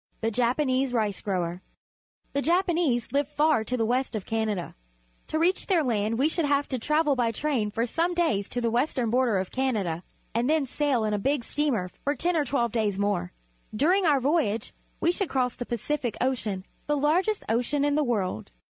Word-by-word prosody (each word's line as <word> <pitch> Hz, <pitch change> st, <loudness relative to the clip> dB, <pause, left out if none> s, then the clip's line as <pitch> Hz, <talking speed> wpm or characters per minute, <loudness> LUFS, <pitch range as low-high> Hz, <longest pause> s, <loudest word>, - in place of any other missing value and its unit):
The 225 Hz, 0 st, 0 dB
Japanese 255 Hz, +2 st, +1 dB
Rice 215 Hz, -4 st, 0 dB
grower. 180 Hz, -3 st, -2 dB, 0.3 s
— -, -, -45 dB
The 280 Hz, -, +1 dB
Japa 350 Hz, +4 st, +2 dB
nese 255 Hz, -8 st, 0 dB
live 285 Hz, 0 st, +2 dB
far 300 Hz, -4 st, +2 dB
to 250 Hz, +3 st, -2 dB
the 225 Hz, -, +1 dB
west 250 Hz, +1 st, 0 dB
of 210 Hz, -, -4 dB
Canada. 215 Hz, -5 st, -2 dB, 0.5 s
To 315 Hz, -, -1 dB
reach 350 Hz, +4 st, +1 dB
their 355 Hz, -5 st, +3 dB
land 225 Hz, -3 st, 0 dB
we 275 Hz, +4 st, +3 dB
should 320 Hz, 0 st, 0 dB
have 285 Hz, 0 st, +1 dB
to 255 Hz, -, -2 dB
travel 300 Hz, +3 st, +2 dB
by 240 Hz, -2 st, +1 dB
train 245 Hz, -3 st, -1 dB
for 230 Hz, +3 st, -1 dB
some 335 Hz, +8 st, 0 dB
days 220 Hz, -, +1 dB
to 245 Hz, -, -3 dB
the 230 Hz, -1 st, 0 dB
west 245 Hz, +6 st, 0 dB
ern 235 Hz, -3 st, 0 dB
border 245 Hz, -4 st, +2 dB
of 185 Hz, 0 st, -3 dB
Canada, 210 Hz, -11 st, -1 dB, 0.3 s
and 235 Hz, +4 st, +1 dB
then 310 Hz, -2 st, +3 dB
sail 270 Hz, -3 st, 0 dB
in 210 Hz, -, 0 dB
a 205 Hz, -, 0 dB
big 275 Hz, +4 st, 0 dB
steamer 265 Hz, -10 st, 0 dB, 0.2 s
for 285 Hz, +1 st, 0 dB
ten 345 Hz, +6 st, 0 dB
or 305 Hz, -3 st, +2 dB
twelve 240 Hz, -3 st, 0 dB
days 210 Hz, -4 st, 0 dB
more. 200 Hz, -, 0 dB, 0.4 s
During 350 Hz, -, +3 dB
our 290 Hz, -3 st, +4 dB
voj^age 260 Hz, -6 st, 0 dB, 0.3 s
we 340 Hz, -, +3 dB
should 370 Hz, 0 st, -2 dB
cross 250 Hz, -2 st, 0 dB
the 245 Hz, -, -6 dB
Pacific 240 Hz, 0 st, -2 dB
Ocean 215 Hz, -7 st, -1 dB
— -, -, -38 dB
the 295 Hz, 0 st, +1 dB
largest 355 Hz, +9 st, +1 dB
ocean 250 Hz, +6 st, +1 dB
in 290 Hz, -, +2 dB
the 300 Hz, +1 st, +2 dB
world. 200 Hz, -, -2 dB
255 Hz, 210 wpm, -27 LUFS, 220-295 Hz, 0.5 s, our